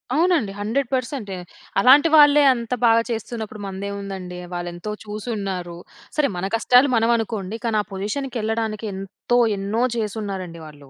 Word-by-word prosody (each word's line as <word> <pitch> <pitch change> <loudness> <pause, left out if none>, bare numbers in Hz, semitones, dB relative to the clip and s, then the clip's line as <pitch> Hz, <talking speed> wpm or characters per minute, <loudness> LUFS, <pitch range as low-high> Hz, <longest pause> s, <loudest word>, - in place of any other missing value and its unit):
అవునండి. 325 - +2
100% 230 +5 -1
పర్సెంటే 245 -7 -2 0.4
అలాంటి 280 +9 +7
వాళ్ళే, 295 -1 +7
అంత 235 -1 -4
బాగా 230 0 +5
చేస్తున్నప్పుడు, 220 -1 -5
మందేముందండి! 195 -2 -6 0.2
వాళ్ళేంతో 175 +3 -5
చూసి 210 +1 -7
ఉన్నారు. 180 -4 -4 0.4
సరే! 300 -2 +3
మన 175 - -2
కష్టాలు, 250 +4 +5
మనం 225 0 +2
అనుకోండి. 215 -3 -3
కానీ 225 -2 +1
ఆ - - -7
పొజిషన్‌కి 215 +7 -4
వెళ్ళడానికి, 220 0 -2
ఎంతో 195 +5 -2 0.2
ఎన్నో 200 +4 -1 0.2
చేసిన్నారండి 195 -6 -4
వాళ్ళు. 145 -2 -14
215 Hz, 140 wpm, -22 LUFS, 195-240 Hz, 0.4 s, అలాంటి